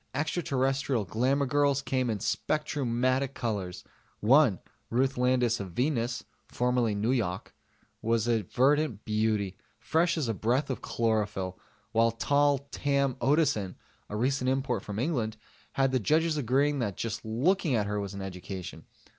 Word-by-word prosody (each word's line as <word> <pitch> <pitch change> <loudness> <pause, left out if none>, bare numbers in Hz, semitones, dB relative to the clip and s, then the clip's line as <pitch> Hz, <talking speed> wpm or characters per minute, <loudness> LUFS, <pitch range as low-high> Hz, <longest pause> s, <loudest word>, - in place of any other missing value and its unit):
Extraterrestrial 135 - 0
glamour 130 - +1
girls 140 0 +2
came 130 -2 0
in 110 - 0
spectrumatic 130 -1 0
colors: 100 -6 -3 0.4
one, 125 -2 +5 0.3
Ruth 130 +3 +1
Landis 125 -2 +2
of 95 -3 -6
Venus 125 - 0 0.2
(formerly 125 -3 +1
Nuyok), 105 -4 -1 0.5
was 115 0 +1
a 115 -2 +2
verdant 130 - +1
beauty, 105 -3 0 0.2
fresh 165 +9 +1
as 150 -6 0
a 115 - 0
breath 125 +7 0
of 130 - -4
chlorophyll; 105 -5 -1 0.3
while 115 +1 +4
tall 140 +4 +1
Tam 140 -2 +1
Otteson, 130 - +2 0.3
a 105 - -5
recent 130 +3 +1
import 130 -5 0
from 105 -1 -6
England, 115 -5 -1 0.4
had 135 -1 +2
the 130 - +2
judges 155 +7 +2
agreeing 140 +2 +1
that 105 -6 -2
just 115 -1 -3
looking 140 - +1
at 105 -2 +1
her 105 0 -2
was 100 0 -5
an 100 - -5
education. 90 -2 -7
125 Hz, 140 wpm, -29 LUFS, 110-140 Hz, 0.5 s, one